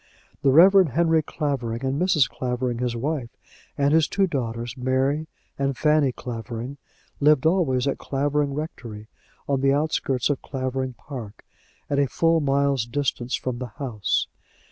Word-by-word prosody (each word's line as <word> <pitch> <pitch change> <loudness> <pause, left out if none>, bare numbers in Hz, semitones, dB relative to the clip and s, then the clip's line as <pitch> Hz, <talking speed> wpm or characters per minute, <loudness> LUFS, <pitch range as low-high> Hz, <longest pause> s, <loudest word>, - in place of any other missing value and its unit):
The 140 - +3
Reverend 180 +1 +6
Henry 165 0 +3
Clavering, 135 -6 -3
and 135 +4 -1
Mrs. 160 -8 +4
Clavering 125 -1 -3
his 125 -1 -1
wife, 135 0 -2 0.5
and 140 +1 +2
his 160 -2 +4
two 195 - +1
daughters, 120 - -3
Mary 135 +4 0 0.3
and 135 -2 0
Fanny 150 -3 +3
Clavering, 120 +2 -6 0.4
lived 150 -1 +4
always 155 -7 +2
at 140 - -1
Clavering 145 0 -1
Rectory, 115 -8 -7 0.4
on 140 -2 0
the 135 0 +3
outskirts 145 -3 0
of 140 - -2
Clavering 130 -1 -3
Park, 120 -6 -9 0.4
at 140 - 0
a 140 - +3
full 165 +5 +2
mile's 140 -3 +1
distance 125 -1 -1
from 125 -2 -4
the 125 -3 -6
house. 120 - -1
135 Hz, 145 wpm, -24 LUFS, 125-150 Hz, 0.5 s, Reverend